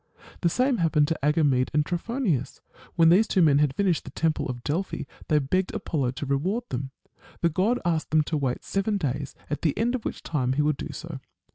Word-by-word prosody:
The 170 Hz, -, +3 dB
same 255 Hz, +6 st, +2 dB
happened 155 Hz, -4 st, +3 dB
to 165 Hz, -, -1 dB
Agamede 145 Hz, -4 st, +3 dB
and 150 Hz, -1 st, +3 dB
Trophonius. 180 Hz, -, -2 dB, 0.4 s
When 165 Hz, -1 st, +6 dB
these 200 Hz, +6 st, +5 dB
two 185 Hz, -, +3 dB
men 145 Hz, -3 st, +5 dB
had 145 Hz, -3 st, +2 dB
finished 185 Hz, -4 st, +1 dB
the -, -, -9 dB
temple 160 Hz, +3 st, 0 dB
of 120 Hz, -1 st, -5 dB
Delphi, 175 Hz, +7 st, -2 dB, 0.2 s
they 155 Hz, -, +3 dB
begged 180 Hz, +7 st, 0 dB
Apollo 140 Hz, -6 st, -1 dB
to 145 Hz, -, -5 dB
reward 170 Hz, -, 0 dB
them. 135 Hz, +2 st, -3 dB, 0.5 s
The 170 Hz, -, +3 dB
god 195 Hz, +9 st, +1 dB
asked 165 Hz, -2 st, 0 dB
them 155 Hz, 0 st, +3 dB
to 155 Hz, -, -3 dB
wait 130 Hz, -3 st, -2 dB
seven 200 Hz, +1 st, 0 dB
days, 140 Hz, -4 st, -3 dB
at 150 Hz, -, -3 dB
the 155 Hz, -4 st, 0 dB
end 235 Hz, +2 st, +1 dB
of 255 Hz, -, -3 dB
which -, -, -5 dB
time 130 Hz, -5 st, 0 dB
he 150 Hz, +2 st, +1 dB
would 150 Hz, -1 st, +1 dB
do -, -, -6 dB
so. 160 Hz, -4 st, -7 dB
155 Hz, 215 wpm, -26 LUFS, 140-185 Hz, 0.5 s, When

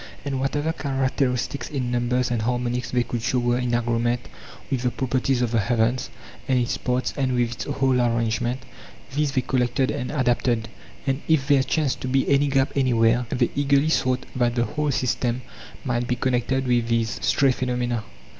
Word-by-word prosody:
And 135 Hz, -2 st, -2 dB
whatever 145 Hz, +4 st, 0 dB
characteristics 135 Hz, -2 st, -1 dB
in 130 Hz, -4 st, -2 dB
numbers 125 Hz, +1 st, 0 dB
and 120 Hz, -2 st, 0 dB
harmonies 125 Hz, +1 st, -1 dB
they 125 Hz, -1 st, +1 dB
could 120 Hz, -1 st, -4 dB
show 125 Hz, -, 0 dB
were 120 Hz, 0 st, +1 dB
in 125 Hz, -1 st, 0 dB
agreement 120 Hz, -, 0 dB, 0.4 s
with 130 Hz, -3 st, 0 dB
the 125 Hz, -, +1 dB
properties 130 Hz, 0 st, 0 dB
of 120 Hz, -, -1 dB
the 115 Hz, -, +2 dB
heavens 120 Hz, +3 st, +1 dB, 0.4 s
and 130 Hz, -, +2 dB
its 125 Hz, +1 st, 0 dB
parts 125 Hz, -1 st, -1 dB
and 130 Hz, -2 st, 0 dB
with 120 Hz, -1 st, +1 dB
its 120 Hz, -, -5 dB
whole 135 Hz, -3 st, +1 dB
arrangement, 120 Hz, +1 st, 0 dB, 0.5 s
these 145 Hz, -1 st, 0 dB
they 130 Hz, -, +2 dB
collected 130 Hz, +1 st, 0 dB
and 130 Hz, -3 st, -3 dB
adapted; 120 Hz, -4 st, +1 dB, 0.4 s
and 135 Hz, +1 st, 0 dB
if 155 Hz, -4 st, +2 dB
there 140 Hz, -2 st, +5 dB
chanced 145 Hz, 0 st, 0 dB
to -, -, -3 dB
be 135 Hz, +1 st, +1 dB
any 140 Hz, +1 st, +3 dB
gap 135 Hz, -1 st, +2 dB
anywhere, 120 Hz, -3 st, +3 dB
they 120 Hz, -1 st, +1 dB
eagerly 140 Hz, +1 st, +3 dB
sought 130 Hz, -4 st, +1 dB
that 120 Hz, -2 st, +1 dB
the 120 Hz, -1 st, +2 dB
whole 150 Hz, +2 st, -2 dB
system 125 Hz, -1 st, 0 dB, 0.4 s
might 120 Hz, -1 st, -1 dB
be 125 Hz, -, +1 dB
con 130 Hz, +1 st, 0 dB
nected 130 Hz, +2 st, 0 dB
with 120 Hz, -2 st, +2 dB
these 115 Hz, -1 st, 0 dB
(stray. 135 Hz, -1 st, +3 dB
phenomena). 125 Hz, -2 st, -1 dB
125 Hz, 185 wpm, -24 LUFS, 120-135 Hz, 0.5 s, there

